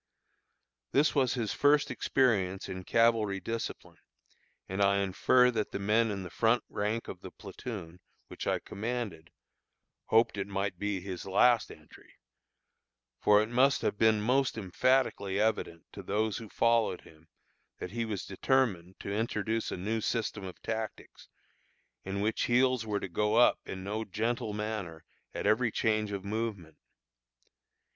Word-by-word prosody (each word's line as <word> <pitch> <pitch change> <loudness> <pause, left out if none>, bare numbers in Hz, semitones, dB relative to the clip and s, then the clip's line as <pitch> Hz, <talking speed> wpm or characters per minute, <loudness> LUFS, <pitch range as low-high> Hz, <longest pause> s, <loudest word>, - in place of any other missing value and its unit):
This 145 +3 +4
was 135 -4 +2
his 115 -4 -2
first 145 0 +3
experience 100 -8 +1
in 95 0 -6
cavalry 115 -4 +2
discipline; 115 +5 -5 0.7
and 95 +2 -3
I 100 0 +4
infer 105 +6 +3
that 110 -3 -2
the - - -3
men 110 +3 +2
in 100 -2 -3
the 90 - -8
front 115 +1 +2
rank 105 +3 -2
of 90 - -8
the 95 - -8
platoon, 95 -3 -8 0.3
which - - -7
I - - +2
commanded, 105 -7 -5 0.8
hoped 110 -2 +3
it 100 - -2
might 100 -2 -3
be 100 -2 -2
his 95 0 -6
last 115 +4 +4
entry; - - -16 1.0
for 105 0 +5
it 110 - -5
must 130 +3 +3
have 105 - -1
been 110 -1 +4
most 125 +3 +1
emphatically 100 -1 +1
evident 105 -6 -1
to - - -8
those 105 +1 -1
who 110 -2 -10
followed 115 -5 +2
him 80 0 -19 0.5
that 90 - -6
he 115 +2 -2
was 105 -4 -4
determined 95 -4 0
to 100 - -4
introduce 110 +1 -1
a - - -3
new 110 +5 -2
system 110 -2 -2
of 95 -1 -8
tactics, 110 -1 -5 0.8
in 95 +1 -3
which 110 +2 0
heels 125 -1 +2
were 105 -1 0
to - - -5
go 105 +4 0
up 120 +1 +5
in 95 -1 -6
no 105 +3 -3
gentle 110 +2 -2
manner 105 -6 -5 0.3
at - - -3
every 115 +1 +3
change 110 -1 0
of 100 -1 -5
movement. 100 -7 -4
105 Hz, 150 wpm, -30 LUFS, 95-115 Hz, 1.0 s, for